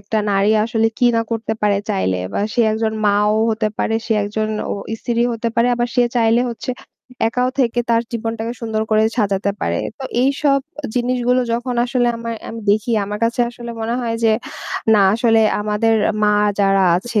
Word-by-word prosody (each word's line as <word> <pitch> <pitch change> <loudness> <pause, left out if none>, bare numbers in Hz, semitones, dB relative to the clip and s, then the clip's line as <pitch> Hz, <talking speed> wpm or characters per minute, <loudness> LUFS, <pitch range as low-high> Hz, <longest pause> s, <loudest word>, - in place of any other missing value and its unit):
একটা 210 +2 -2
নারী 195 +2 +3
আসলে 225 -1 +1
কি 245 - +4
না - - +3
করতে 225 -1 -2
পারে 200 -1 +2
চাইলে 95 0 0 0.2
বা - - -2
সে 240 - +1
একজন 220 0 -1
মা'ও 210 +1 +3
হতে 215 -1 0
পারে, 225 - 0
সে 225 - +1
একজন 215 +1 -2 0.2
অ - - 0 0.3
স্ত্রী 235 -1 0
হতে 230 0 -2
পারে 235 +1 +3
আবার 240 0 -1
সে 245 - +5
চাইলে 230 +1 +3
হচ্ছে 235 +2 -5 0.6
একাও 250 +2 0
থেকে 240 -1 +1
তার 230 0 +3
জীবনটাকে 225 0 -3
সুন্দর 220 -1 -2
করে 215 0 +4 0.2
সাজাতে 200 -1 +1
পারে। 85 0 -1 0.2
তো 265 - -6 0.2
এইসব 275 +1 +2 0.4
জিনিসগুলো 250 0 +1
যখন 245 +1 -2
আসলে 245 -1 0
আমা 230 0 -5 0.2
আমি 230 0 -7
দেখি 215 +3 +1
আমার 210 +1 -5
কাছে 235 +1 0
আসলে 240 0 -8
মনে 230 +2 -1
হয় 230 -2 -2
যে, 225 - +5 0.6
না - - +5 0.2
আসলে 225 -1 +3 0.2
আমাদের 210 +2 +1 0.3
মা 210 - +4 0.3
যারা 195 -1 +3
আছে 215 +2 -1
225 Hz, 180 wpm, -19 LUFS, 210-240 Hz, 0.6 s, সে